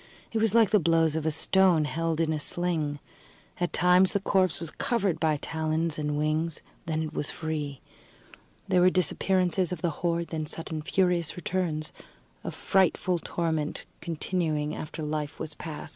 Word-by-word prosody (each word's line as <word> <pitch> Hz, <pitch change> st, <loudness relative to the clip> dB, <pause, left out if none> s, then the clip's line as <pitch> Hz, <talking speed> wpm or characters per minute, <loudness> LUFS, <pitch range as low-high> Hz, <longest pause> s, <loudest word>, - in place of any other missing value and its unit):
It 225 Hz, -, 0 dB
was 220 Hz, -1 st, +2 dB
like 225 Hz, -3 st, +5 dB
the 210 Hz, -, +5 dB
blows 165 Hz, -2 st, +3 dB
of 160 Hz, 0 st, -1 dB
a -, -, +4 dB
stone 170 Hz, +1 st, +4 dB
held 165 Hz, +1 st, -1 dB
in 160 Hz, -1 st, +1 dB
a 155 Hz, -, -2 dB
sling. 160 Hz, -2 st, -1 dB, 0.6 s
At 175 Hz, 0 st, 0 dB
times 180 Hz, +1 st, +5 dB
the 200 Hz, -, +2 dB
corpse 190 Hz, -2 st, +1 dB
was 165 Hz, -2 st, -4 dB
covered 200 Hz, -9 st, 0 dB
by 155 Hz, -2 st, +2 dB
talons 160 Hz, +1 st, -1 dB
and 150 Hz, -1 st, -1 dB
wings; 155 Hz, +1 st, -1 dB, 0.2 s
then 160 Hz, -1 st, 0 dB
it 155 Hz, 0 st, -5 dB
was 145 Hz, -, -1 dB
free. 150 Hz, -4 st, -4 dB, 0.9 s
There 185 Hz, -2 st, +3 dB
were 180 Hz, -, +7 dB
disappearances 185 Hz, 0 st, +1 dB
of 175 Hz, -3 st, -5 dB
the 170 Hz, -, +2 dB
horde, 170 Hz, -1 st, 0 dB
then 155 Hz, -2 st, -3 dB
sudden 160 Hz, 0 st, -3 dB
furious 180 Hz, -1 st, +1 dB
returns 175 Hz, -3 st, -2 dB, 0.5 s
a -, -, -3 dB
frightful 185 Hz, -2 st, +1 dB
torment 160 Hz, -3 st, -2 dB, 0.2 s
continuing 160 Hz, -3 st, -1 dB
after 155 Hz, +1 st, -6 dB
life 150 Hz, -1 st, -3 dB
was 155 Hz, -, -4 dB
past. 155 Hz, -3 st, -7 dB
165 Hz, 165 wpm, -28 LUFS, 155-180 Hz, 0.9 s, were